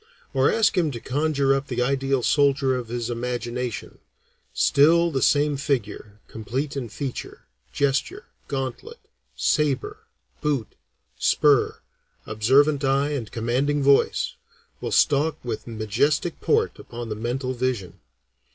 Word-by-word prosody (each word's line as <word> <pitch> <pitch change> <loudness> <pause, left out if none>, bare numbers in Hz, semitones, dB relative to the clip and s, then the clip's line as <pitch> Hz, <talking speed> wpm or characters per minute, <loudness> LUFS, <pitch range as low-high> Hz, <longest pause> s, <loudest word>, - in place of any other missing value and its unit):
Or 135 0 +3
ask 225 -2 +2
him 170 -4 +2
to 120 - -5
conjure 140 +1 +1
up 135 +1 -2
the 125 -1 -1
ideal 135 0 0
soldier 140 -2 +3
of 125 -2 -4
his 120 0 -3
imagination, 120 0 -4 0.5
still 170 +4 +4
the 135 -3 -1
same 145 0 +3
figure, 110 -7 -3
complete 130 +7 -4
in 125 -4 -4
feature, 135 +3 -6 0.3
gesture, 140 - -1 0.2
gauntlet, 135 -3 -5 0.4
saber, 135 - 0 0.4
boot, 140 -7 -1 0.5
spur, 145 -4 +3 0.4
observant 135 +7 +3
eye 135 +1 +2
and 125 -7 -4
commanding 130 +6 0
voice, 140 0 +3 0.5
will - - -4
stalk 150 +3 +3
with 115 -1 -4
majestic 120 - 0
port 445 +1 +1
upon 120 -1 -8
the 105 - -3
mental 125 +4 -3
vision. 115 -8 -3
135 Hz, 125 wpm, -24 LUFS, 120-145 Hz, 0.5 s, still